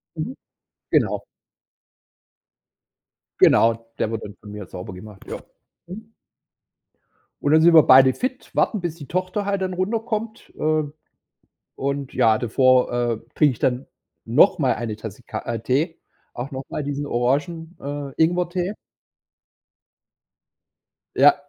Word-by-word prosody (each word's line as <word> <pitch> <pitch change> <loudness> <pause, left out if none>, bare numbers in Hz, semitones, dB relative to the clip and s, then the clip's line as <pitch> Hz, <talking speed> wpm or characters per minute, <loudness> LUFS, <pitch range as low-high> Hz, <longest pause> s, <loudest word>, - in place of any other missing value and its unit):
Mhm. - - -4 0.6
Genau. - - +2 2.2
Genau, 115 0 +4
der 110 - 0
wird 115 - -4
dann 105 0 -9
von 105 - -12
mir 105 -2 -7
sauber 90 +1 -8
gemacht. 95 +1 -12
Ja. - - -5 0.5
Mhm. 220 +5 -10 1.3
Und 145 - +1
dann 160 0 +6
sind 170 0 +6
wir 160 - +9
beide 130 0 +7
fit, 255 0 -4
warten, 210 -5 +1
bis 170 -2 -3
die 145 -5 -11
Tochter 185 +3 -2
halt 200 -1 -1
dann 185 -1 -2
runterkommt. 220 +3 -3
Ähm, 155 -1 0 0.8
und 140 0 -3
ja, 110 -1 +4
davor, 130 +1 +3
äh, 120 -2 0 0.2
trinke 150 -4 +4
ich 115 - -11
dann 125 +1 0 0.4
noch 130 - +4
mal 130 -5 +2
eine 115 -3 -4
Tasse 110 +2 -9
Ka - - -5
äh, 115 -2 -4
Tee, 150 +8 0 0.3
auch 125 +4 -6
noch 130 0 -4
mal 150 - -4
diesen 145 0 -3
Orangen 150 +8 -1
äh, 140 0 -5
Ingwertee. 180 +3 0 2.4
Ja, - - +7
140 Hz, 135 wpm, -22 LUFS, 120-175 Hz, 2.4 s, wir